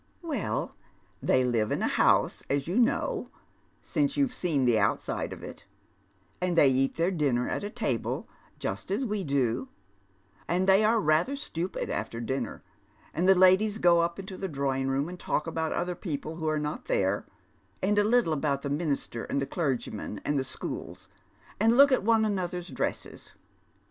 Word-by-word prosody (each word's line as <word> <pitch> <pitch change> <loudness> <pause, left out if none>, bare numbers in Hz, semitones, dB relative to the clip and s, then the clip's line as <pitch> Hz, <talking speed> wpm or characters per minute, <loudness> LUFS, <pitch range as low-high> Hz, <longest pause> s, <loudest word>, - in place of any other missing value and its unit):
" - - -39
Well, 250 - -2 0.5
they 130 - +3
live 115 -4 +1
in - - 0
a - - +2
house, - - +3
as 140 0 0
you 185 +8 +1
know, 235 - +1 0.5
since 285 -1 0
you've 275 -3 +2
seen 160 - 0
the 115 -3 +4
outside - - -1
of - - -8
it, - - -9 0.8
and 180 -1 0
they 145 - +7
eat 135 +1 +1
their 170 +3 +1
dinner 140 -8 +1
at - - -2
a 205 - -3
table, 145 - -2 0.3
just 100 - -4
as 210 +8 0
we 210 -3 -2
^lo, 130 -3 0 0.8
and 180 +2 +1
they 195 +2 +6
are 225 +2 +4
rather 165 - +2
stupid 180 - -4
after 115 +1 -3
dinner, 130 +3 -3 0.5
and 175 +3 +1
the 190 - +8
ladies 190 +3 +5
go 175 -5 +5
up 170 0 0
into 190 -1 -7
the 195 - -3
drawing 135 -4 -1
room 135 +2 0
and 180 +1 -8
talk 150 - -1
about 160 -1 -2
other 180 +1 -1
people 160 -3 -5
who 160 -2 -3
are 155 0 +1
not 150 0 -3
there, - - 0 0.6
and 205 +2 +3
a - - +4
little 220 -6 +3
about 140 -2 -1
the 140 - -2
minister, 145 -6 -2
and - - -1
the 140 - -1
clergyman, 130 - -3
and 145 -1 +1
the - - 0
Bchools, 130 - -7 0.5
and 225 +3 +4
look 280 +1 +8
at 260 - +3
one 220 +1 +3
another's 180 -3 -2
dresses. - - -4
170 Hz, 180 wpm, -28 LUFS, 140-200 Hz, 0.8 s, the